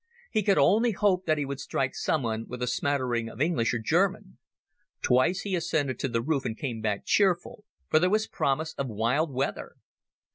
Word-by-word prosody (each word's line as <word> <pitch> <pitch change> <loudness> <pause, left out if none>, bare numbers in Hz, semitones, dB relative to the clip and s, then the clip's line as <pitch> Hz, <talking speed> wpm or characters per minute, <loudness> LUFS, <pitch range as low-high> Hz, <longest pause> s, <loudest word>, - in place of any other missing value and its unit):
He 215 - +2
could 200 -1 +2
only 225 +3 +4
hope 190 -2 +1
that 155 -1 +3
he 145 - -1
would 140 0 -5
strike 135 -2 -2
someone 115 -7 -1
with 125 0 -5
a - - +2
smattering 125 -2 -1
of 115 - -12
English 150 -6 +1
or 115 - 0
German. 110 - 0 0.6
Twice 130 +10 +3
he 200 - -4
ascended 145 -7 -1
to - - -1
the 115 -2 -1
roof 140 -1 0
and 115 -3 -4
came 120 -6 -4
back 105 -2 -2
cheerful, 195 +1 +1 0.2
for 155 - +4
there 180 +3 +2
was 215 +2 +2
promise 160 0 -1
of 140 - -1
wild 125 +8 0
weather. 135 +1 -3
140 Hz, 190 wpm, -27 LUFS, 120-175 Hz, 0.6 s, only